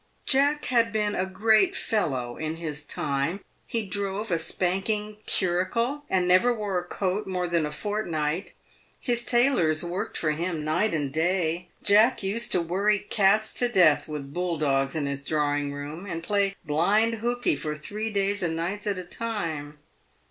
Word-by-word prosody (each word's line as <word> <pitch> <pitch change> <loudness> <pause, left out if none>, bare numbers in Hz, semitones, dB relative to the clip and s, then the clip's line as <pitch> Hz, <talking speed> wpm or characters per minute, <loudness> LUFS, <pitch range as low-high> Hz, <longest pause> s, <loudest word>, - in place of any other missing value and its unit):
Jack 285 +2 +3
had 230 -2 +2
been 210 -1 0
a 185 -1 -1
great 220 - +3
fellow 130 - -1
in 155 0 -3
his 155 -3 -5
time. 140 +5 -2 0.3
He 225 -2 -2
drove 200 +2 -3
a 170 - +2
spanking 210 +5 -1
curricle, 230 +10 0
and 185 -2 +2
never 185 +7 +5
wore 205 -5 -1
a - - -6
coat 190 +3 -2
more 180 -1 -1
than 170 -3 +1
a - - -6
fortnight. 170 -3 -2 0.5
His 240 -2 0
tailors 240 - +2
worked 175 +4 -3
for 155 - +1
him 165 0 -2
night 170 +5 +1
and 145 -3 -2
day. 170 +1 0 0.2
Jack 215 +3 +5
used 210 +4 -1
to 180 - +3
worry 200 +5 +2
cats 210 +1 +2
to 245 - +1
death 180 -9 +4
with 145 -2 -6
bull 175 -1 -1
dogs 135 -1 +1
in 155 -2 -1
his 140 0 -3
drawing 145 -1 0
room, 145 +6 -6
and 165 -3 -4
play 200 0 +1
blind 210 +9 +2
hookey 245 -5 +1
for 150 +2 -4
three 210 +8 -4
days 200 0 0
and 165 -2 -1
nights 190 +6 -3
at 200 -2 0
a 185 - -4
time. 165 -8 -4
185 Hz, 170 wpm, -26 LUFS, 155-210 Hz, 0.5 s, never